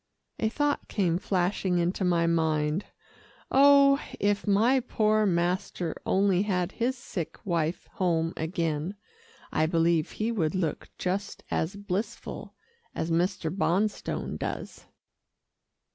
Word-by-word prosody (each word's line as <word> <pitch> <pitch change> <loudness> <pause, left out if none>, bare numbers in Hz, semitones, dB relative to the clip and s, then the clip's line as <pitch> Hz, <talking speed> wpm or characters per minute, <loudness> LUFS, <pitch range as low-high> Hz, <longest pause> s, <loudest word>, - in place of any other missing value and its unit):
A 220 - +1
thought 290 +4 -1
came 175 -4 +1
flashing 185 -1 0
into 175 +3 0
my 170 -2 +2
mind. 160 +1 +1 0.7
"Oh! 280 0 +6 0.2
if 205 +1 +1
my 225 +7 +4
poor 215 -3 +2
master 175 -1 -1
only 190 -1 +3
had 185 -3 0
his 250 +2 -1
sick 180 -8 -5
wife 170 -2 -1
home 165 -3 0
again 165 +1 -2 0.6
I 155 - +2
believe 165 -1 +2
he 220 +2 -1
would 175 -7 0
look 170 -5 -2
just 195 +2 -3
as 160 +5 -1
blissful 205 +3 -5 0.4
as 160 - -2
Mr. 175 0 0
Bonstone 195 +3 -1
does." - - -5
185 Hz, 115 wpm, -28 LUFS, 170-210 Hz, 0.7 s, Oh